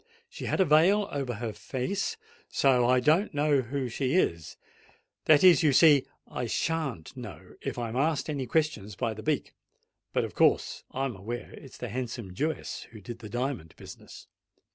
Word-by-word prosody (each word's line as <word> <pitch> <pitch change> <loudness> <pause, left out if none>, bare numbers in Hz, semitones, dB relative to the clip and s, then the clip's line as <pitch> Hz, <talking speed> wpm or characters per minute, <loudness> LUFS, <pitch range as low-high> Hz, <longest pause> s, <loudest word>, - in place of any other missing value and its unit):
She - - -8
had - - -1
a 190 - +5
veil 180 +7 +4
over 135 -4 -3
her 110 0 -4
face—and 200 - -3 0.3
so 125 -3 +3
I 130 0 +5
don't 155 - +2
know 145 -1 +3
who 130 +1 -3
she 130 +4 -1
is: 85 - 0 0.7
that 155 0 +6
is, 180 -2 +7
you 155 -3 +4
see, 145 -2 +6 0.2
I 125 - -4
shan't 140 - -2
know, - - -10
if - - -4
I'm 120 -1 -3
asked 145 +2 +1
any 140 -4 -3
questions 115 -9 -1
by 115 0 -1
the 110 - -8
beak:—but - - -4
of - - -5
course - - +2
I'm 135 -3 -3
aware 115 +6 -6
it's 135 -4 -12
the 125 - -5
handsome 115 -4 -5
Jewess 155 - -3
that 110 -3 -12
did 115 +4 -8
the 110 -3 -9
diamond 120 - -3
business." - - -12
130 Hz, 170 wpm, -28 LUFS, 115-155 Hz, 0.7 s, is